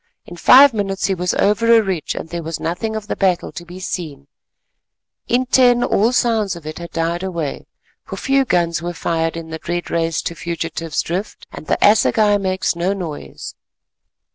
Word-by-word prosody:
In 175 - -10
five 265 +9 +7
minutes 195 -2 -2
he 195 - +1
was 180 -1 -1
over 230 +3 +2
a 225 -1 +6
ridge, 190 -5 -3
and - - -5
there 170 +1 -5
was 165 0 -5
nothing 220 +7 -3
of 215 -1 -4
the - - -3
battle 185 -3 0
to 175 - -8
be 175 +2 -11
seen, 155 -7 -5 1.0
in 250 +2 +1
ten 245 -1 +4
all 220 +4 +2
sounds 225 -6 +1
of 170 -3 -11
it 155 +2 -6
had 170 0 -7
died 165 +1 -2
away, 170 -7 -4 0.4
for - - -8
few 275 0 +2
guns 170 -8 0
were 175 +1 -4
fired 165 0 -1
in 165 -1 -8
the 160 - -5
dread 175 +1 -4
race 165 -1 0
to - - -3
Fugitive's 165 -1 -3
Drift, 185 +5 -5
and 155 - -10
the - - +1
assegai 210 0 +4
makes 185 -2 -1
no 175 +3 0
noise. 170 -7 -7
180 Hz, 190 wpm, -19 LUFS, 165-210 Hz, 1.0 s, five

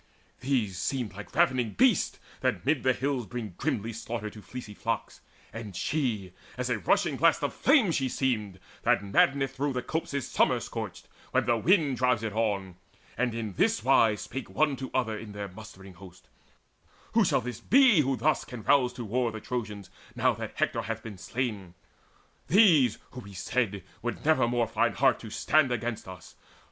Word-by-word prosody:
These 120 -9 -1
seemed 125 -6 -2
like 105 +5 -10
ravening 130 -9 +2
beasts - - +3 0.2
that - - -1
mid 145 -1 +2
the 130 - +3
hills 130 -3 -2
Bring 115 -6 -6
grimly 110 +5 -2
slaughter 110 -1 -5
to 105 - -12
the - - -22
fleecy 125 -4 -8
flocks; - - -4 0.3
And 110 -4 -7
she, 110 - -2 0.2
as 125 0 -2
a 115 - 0
rushing 90 - +1
blast - - +3
of - - -1
flame 260 - +4
she 135 -4 0
seemed 105 -8 -1 0.2
That 100 - +2
maddeneth 135 +7 +2
through 140 +1 -1
the 125 - -2
copses 140 -4 -3
summer - - +2
scorched, - - -6 0.3
When - - +2
the 120 - +3
wind 150 - +3
drives 125 -3 +2
it 110 -2 -3
on; 100 -5 -1 0.4
and 120 -1 -1
in 110 -4 -4
this 110 - +1
wise 115 -5 +4
Spake 130 - -6
one 150 -2 +1
to 130 0 -5
other 115 -4 0
in 105 -1 -8
their 100 -1 -5
mustering 95 -1 -12
host: 90 +1 -15 0.8
"Who 230 - +5
shall 170 - +2
this 125 -1 -6
be 260 - +5
who 135 -1 0
thus 155 -2 +1
can 120 -4 -9
rouse 125 +2 +3
to 120 -1 -6
war 120 +2 0
The 110 - -6
Trojans, 105 -4 -5 0.2
now - - +3
that - - -6
Hector - - 0
hath 115 0 -5
been 105 -5 -8
slain 105 -4 -4 0.7
These 160 - +5
who, 125 - -8
we 100 -4 -11
said, 100 +1 -1 0.2
would 120 +4 -4
never 155 -6 +4
more 120 0 +1
find - - 0
heart - - +3
To - - -9
stand 155 -4 +2
against 115 -2 -3
us? 90 -2 -11
120 Hz, 185 wpm, -28 LUFS, 105-135 Hz, 0.8 s, Who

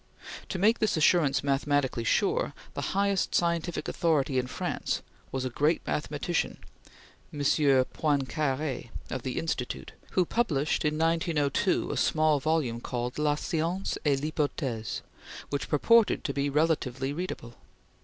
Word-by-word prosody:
To - - -2
make 215 +5 +3
this 215 -5 +1
assurance 150 -3 +3
mathematically 140 -3 +1
sure, - - +1 0.2
the - - -4 0.2
highest 200 -1 +1
scientific 170 0 0
authority 145 -6 +1
in 125 - -2
France - - -2 0.3
was 130 -1 -2
a - - -1
great 150 +6 +1
mathematician, 150 +3 -1 0.7
M. 150 - -7 0.5
Poincare 145 -2 -1 0.2
of - - -2
the 130 0 -4
Institut, 135 -6 -3 0.2
who 185 - +3
published 160 -10 0
in 150 0 +1
1902 165 +1 +1
a - - -2
small 155 -2 +3
volume 140 -6 0
called 125 +3 -3
"La 150 -1 +2
Science 170 +4 -2
et 140 -3 +2
l'Hypothese," 140 -7 -2 0.5
which 140 - -2
purported 230 +9 +4
to 140 - -2
be 140 +1 0
relatively 140 -3 0
readable. 155 -8 -5
150 Hz, 130 wpm, -28 LUFS, 135-165 Hz, 0.7 s, purported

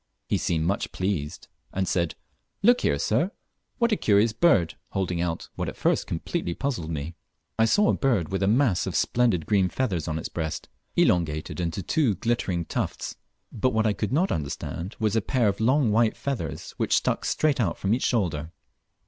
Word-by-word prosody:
He - - +1
seemed 80 -2 0
much 100 +4 -1
pleased, 95 -6 -3 0.2
and 95 0 -1
said, 85 -2 0 0.5
"Look 245 +3 +5
here, - - +2
sir, - - +1 0.5
what 235 -1 +2
a - - +4
curious 105 - +3
bird," 110 - +3 0.2
holding 90 -3 -1
out 85 -1 -3
what - - -3
at - - -9
first - - +1
completely 85 - -3
puzzled 120 - -2
me. 80 +1 -4 0.5
I 110 - +6
saw 205 - +4
a - - +4
bird 115 - +1
with 95 - -1
a 95 - +2
mass 110 -4 +2
of - - -3
splendid 115 -10 +2
green 95 -3 +2
feathers 95 - -1
on 80 - -1
its 80 - -4
breast, 80 -2 -4 0.3
elongated 80 -1 +1
into 85 +2 -2
two 125 - +2
glittering 100 -8 -1
tufts; - - -3 0.4
but, 130 +4 0
what 110 0 +2
I 110 - +3
could 105 +1 -3
not 170 +8 +2
understand 80 +5 -4
was 110 -2 0
a 115 - +3
pair 120 +2 +1
of 100 -1 0
long 125 +1 +3
white 110 +1 +3
feathers, 120 - -4
which - - +2
stuck - - 0
straight 150 -3 +1
out 95 -8 0
from 100 +2 0
each 125 - 0
shoulder. 85 - 0
100 Hz, 190 wpm, -26 LUFS, 85-120 Hz, 0.5 s, I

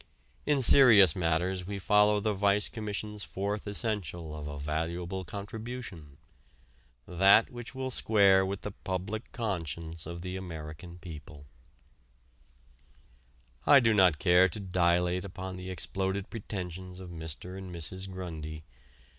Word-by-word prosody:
In 140 -3 +3
serious 110 - +7
matters 90 +2 0
we 100 0 -4
follow 105 +1 +4
the 105 +1 0
Vice 100 +1 +2
Commission's 105 -1 -5
fourth 100 +2 -4
essential 95 - -3
of 75 -1 -6
a 75 0 -6
valuable 85 +5 -3
contribution 100 - -7 0.9
that 95 +5 +5
which 120 +1 -8
will 130 0 -3
square 100 -5 +4
with 95 +1 -3
the 105 - -5
public 95 +4 -5
conscience 85 - -4
of 85 +1 -6
the 90 0 -5
American 85 -1 -8
people. 75 -4 -10 2.2
I 140 - +9
do 115 -3 +3
not 95 -6 +5
care 90 +2 +5
to 90 - -6
dilate 90 -1 +1
upon 95 -1 -6
the 90 0 -7
exploded 95 +1 -3
pretensions 90 -4 -6
of 90 -2 -9
Mr. 80 +2 -3
and 95 -1 -8
Mrs. 95 +3 -3
Grundy. 80 -4 -6
95 Hz, 130 wpm, -30 LUFS, 85-105 Hz, 2.2 s, I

